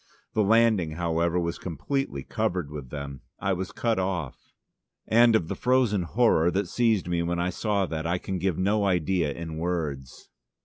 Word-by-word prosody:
The 110 Hz, -, +2 dB
landing, 110 Hz, -6 st, +3 dB
however, 85 Hz, +1 st, 0 dB
was 85 Hz, 0 st, -2 dB
completely 85 Hz, -, -3 dB
covered 85 Hz, -5 st, -2 dB
with 70 Hz, -4 st, -7 dB
them: 70 Hz, -1 st, -6 dB, 0.2 s
I 100 Hz, -1 st, 0 dB
was 95 Hz, 0 st, -4 dB
cut 115 Hz, -4 st, 0 dB
off. 90 Hz, -7 st, -2 dB, 0.7 s
And 115 Hz, 0 st, +5 dB
of 85 Hz, -7 st, +1 dB
the -, -, -2 dB
frozen 125 Hz, -6 st, +2 dB
horror 90 Hz, -3 st, +3 dB
that 95 Hz, +1 st, -1 dB
seized 110 Hz, -4 st, +1 dB
me 85 Hz, -1 st, 0 dB
when 85 Hz, +1 st, -1 dB
I 90 Hz, +1 st, 0 dB
saw 100 Hz, 0 st, 0 dB
that 80 Hz, -2 st, -4 dB
I 90 Hz, +1 st, +1 dB
can 95 Hz, +1 st, -4 dB
give 95 Hz, -2 st, 0 dB
no 100 Hz, +3 st, +1 dB
idea 90 Hz, -3 st, +1 dB
in 80 Hz, +1 st, -6 dB
words. 80 Hz, -7 st, -4 dB
90 Hz, 175 wpm, -26 LUFS, 80-100 Hz, 0.7 s, And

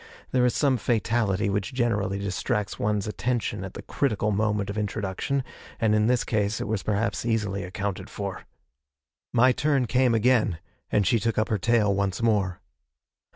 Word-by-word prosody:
There 125 Hz, -1 st, +3 dB
is 125 Hz, -, 0 dB
some 140 Hz, -4 st, +3 dB
fatality 110 Hz, -4 st, +1 dB
which 100 Hz, +3 st, -2 dB
generally 105 Hz, -6 st, 0 dB
distracts 100 Hz, +1 st, -2 dB
one's 105 Hz, -1 st, 0 dB
attention 110 Hz, -2 st, -2 dB
at 95 Hz, -, -8 dB
the -, -, -7 dB
critical 110 Hz, -6 st, 0 dB
moment 105 Hz, -1 st, 0 dB
of -, -, -7 dB
introduction, 105 Hz, +6 st, -2 dB, 0.4 s
and 110 Hz, -2 st, +2 dB
in 105 Hz, 0 st, +3 dB
this 125 Hz, 0 st, +2 dB
case 105 Hz, -1 st, 0 dB
it -, -, -3 dB
was 105 Hz, -2 st, -1 dB
perhaps 105 Hz, +4 st, -1 dB
easily 105 Hz, -4 st, -1 dB
accounted 100 Hz, +2 st, -4 dB
for. 100 Hz, -2 st, -6 dB, 0.8 s
My 125 Hz, +2 st, +5 dB
turn 140 Hz, -1 st, +1 dB
came 125 Hz, 0 st, +3 dB
again, 115 Hz, -6 st, +3 dB, 0.3 s
and 105 Hz, -, +3 dB
she 115 Hz, +1 st, +3 dB
took 115 Hz, +1 st, -1 dB
up 110 Hz, -, +1 dB
her 105 Hz, -, 0 dB
tale 110 Hz, 0 st, +3 dB
once 100 Hz, -1 st, -1 dB
more. 100 Hz, -5 st, +1 dB
105 Hz, 165 wpm, -26 LUFS, 100-120 Hz, 0.8 s, My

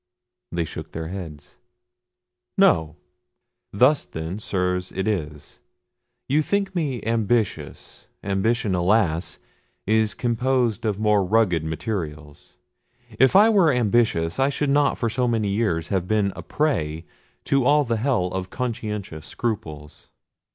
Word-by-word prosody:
They 85 Hz, -1 st, -1 dB
shook -, -, -8 dB
their 80 Hz, 0 st, -5 dB
heads. 80 Hz, -6 st, -9 dB, 1.0 s
"No! 80 Hz, -1 st, +3 dB, 0.8 s
Thus, 130 Hz, +8 st, +4 dB
then, 85 Hz, +2 st, -6 dB
Sirs, 90 Hz, -3 st, -2 dB
it 95 Hz, -, -3 dB
is. 75 Hz, -8 st, -4 dB, 0.7 s
You 145 Hz, +3 st, +2 dB
think 200 Hz, +4 st, -1 dB
me 145 Hz, -, -2 dB
ambitious: 110 Hz, -, -2 dB, 0.2 s
ambition, 100 Hz, +2 st, 0 dB
alas! 90 Hz, -2 st, +1 dB, 0.5 s
is 110 Hz, 0 st, +2 dB
composed 120 Hz, -1 st, 0 dB
of 105 Hz, -3 st, 0 dB
more 105 Hz, -2 st, +2 dB
rugged 95 Hz, -4 st, +2 dB
materials. 80 Hz, -3 st, -6 dB, 0.6 s
If 130 Hz, +8 st, +5 dB
I 210 Hz, +3 st, +7 dB
were 190 Hz, -7 st, +4 dB
ambitious, 115 Hz, -, +1 dB
I 135 Hz, +1 st, +3 dB
should 140 Hz, 0 st, -1 dB
not 145 Hz, 0 st, +2 dB
for 115 Hz, -, -1 dB
so 125 Hz, +2 st, 0 dB
many 110 Hz, -3 st, 0 dB
years 100 Hz, -6 st, -1 dB
have 95 Hz, -2 st, -1 dB
been 105 Hz, -2 st, +1 dB
a -, -, -7 dB
prey 85 Hz, -, -1 dB, 0.4 s
to 135 Hz, -1 st, +1 dB
all 145 Hz, +3 st, +4 dB
the 115 Hz, -3 st, -1 dB
hell 120 Hz, -5 st, +1 dB
of 95 Hz, 0 st, -4 dB
conscientious 105 Hz, -10 st, -5 dB
scruples. 75 Hz, -10 st, -5 dB
105 Hz, 130 wpm, -23 LUFS, 85-120 Hz, 1.0 s, I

